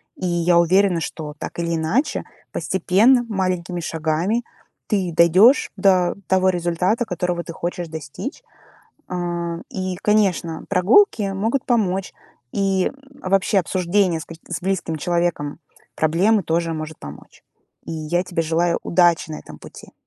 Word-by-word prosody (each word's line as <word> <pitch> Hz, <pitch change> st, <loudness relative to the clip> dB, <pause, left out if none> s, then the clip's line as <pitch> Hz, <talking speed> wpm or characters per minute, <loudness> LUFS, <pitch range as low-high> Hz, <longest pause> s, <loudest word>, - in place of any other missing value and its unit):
И -, -, -5 dB
я 175 Hz, 0 st, +2 dB
уверена, 180 Hz, +1 st, +3 dB
что 150 Hz, -2 st, -6 dB
так -, -, -7 dB
или 170 Hz, 0 st, -1 dB
иначе, 190 Hz, -, 0 dB, 0.3 s
постепенно, 210 Hz, +8 st, +3 dB
маленькими 185 Hz, -3 st, -2 dB
шагами 165 Hz, +8 st, -1 dB, 0.4 s
ты 190 Hz, -4 st, 0 dB
дойдешь 185 Hz, -, +5 dB
до 185 Hz, -2 st, +3 dB
того 190 Hz, 0 st, +3 dB
результата, 180 Hz, +6 st, 0 dB
которого 180 Hz, -3 st, -2 dB
ты 170 Hz, -, -8 dB
хочешь 175 Hz, +1 st, -4 dB
достичь. 160 Hz, -, -7 dB, 0.7 s
А. 175 Hz, -1 st, -3 dB
И, 185 Hz, -1 st, -3 dB
конечно, 190 Hz, -6 st, +1 dB
прогулки 205 Hz, -, +3 dB
могут 225 Hz, +7 st, -1 dB
помочь. 195 Hz, -6 st, 0 dB, 0.4 s
И, 195 Hz, -2 st, +1 dB, 0.3 s
а, -, -, -4 dB
вообще 195 Hz, +2 st, +3 dB
обсуждение 180 Hz, -1 st, +1 dB
с -, -, -7 dB
ка 165 Hz, -, -9 dB
с 165 Hz, -2 st, -4 dB
близким 185 Hz, -4 st, -1 dB
человеком 170 Hz, -2 st, -1 dB, 0.4 s
проблемы 190 Hz, +7 st, +2 dB
тоже 165 Hz, 0 st, -1 dB
может 155 Hz, 0 st, -6 dB
помочь. 75 Hz, 0 st, -12 dB, 0.4 s
И -, -, -6 dB
я 165 Hz, +3 st, -1 dB
тебе 180 Hz, -2 st, -2 dB
желаю 165 Hz, +2 st, +1 dB
удачи 175 Hz, -2 st, +2 dB
на 155 Hz, -, -5 dB
этом -, -, -12 dB
пути. -, -, -13 dB
180 Hz, 140 wpm, -21 LUFS, 165-195 Hz, 0.7 s, дойдешь